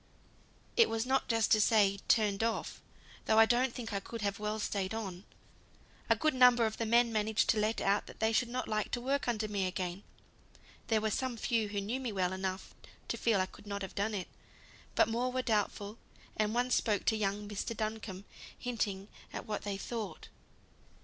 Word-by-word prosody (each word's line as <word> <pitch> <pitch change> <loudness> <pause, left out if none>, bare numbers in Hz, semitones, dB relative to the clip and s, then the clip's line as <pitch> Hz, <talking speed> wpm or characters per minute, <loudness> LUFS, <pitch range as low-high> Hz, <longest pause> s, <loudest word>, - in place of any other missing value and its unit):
"It 465 - +6
was 225 +1 -1
not 265 +1 +1
just 225 -2 +2
to 215 -1 +6
say 205 -2 +4
turned 210 -3 +3
off, 230 0 -2 0.4
though 220 - +3
I 225 - +9
don't 245 +2 +2
think 230 -3 -6
I 200 - 0
could 230 +2 -7
have 200 0 -1
well 210 +1 -2
stayed 200 -1 -2
on. 195 -4 -5 0.8
A - - +6
good 310 0 +1
number 250 -2 +6
of 220 0 -2
the 230 - -1
men 235 +1 +4
managed 215 0 +1
to 220 - 0
let 215 +2 +1
out 200 +1 +1
they 220 0 +1
should 240 +2 +2
not 255 +1 -3
like 215 -1 -1
to 245 - +1
work 275 +3 -1
under 220 -3 0
me 200 -3 -1
again; 180 0 -3 0.9
there 220 -2 +2
were 220 0 0
some 255 +1 -2
few 225 -1 0
who 205 0 -2
knew 215 +6 -2
me 255 -4 -3
well 185 -2 0
enough 190 0 -4 0.4
to - - 0
feel 225 -4 +2
I 185 - +2
could 200 - -15
not 200 -1 -3
have 190 - -6
done 210 +2 -1
it, 185 -3 -3 0.7
but - - +5
more 240 +3 0
were 255 0 -1
doubtful; 210 -1 -1 0.4
and 215 +1 0
one 250 +1 +1
spoke 210 -5 +1
to 220 - +3
young 205 0 -1
Mr. 210 +2 -4
Duncombe, 215 -3 -4 0.3
hinting 205 -5 -2 0.2
at - - -6
what 210 -1 -3
they 200 -1 -3
thought." 210 -5 -5
215 Hz, 200 wpm, -33 LUFS, 200-235 Hz, 0.9 s, I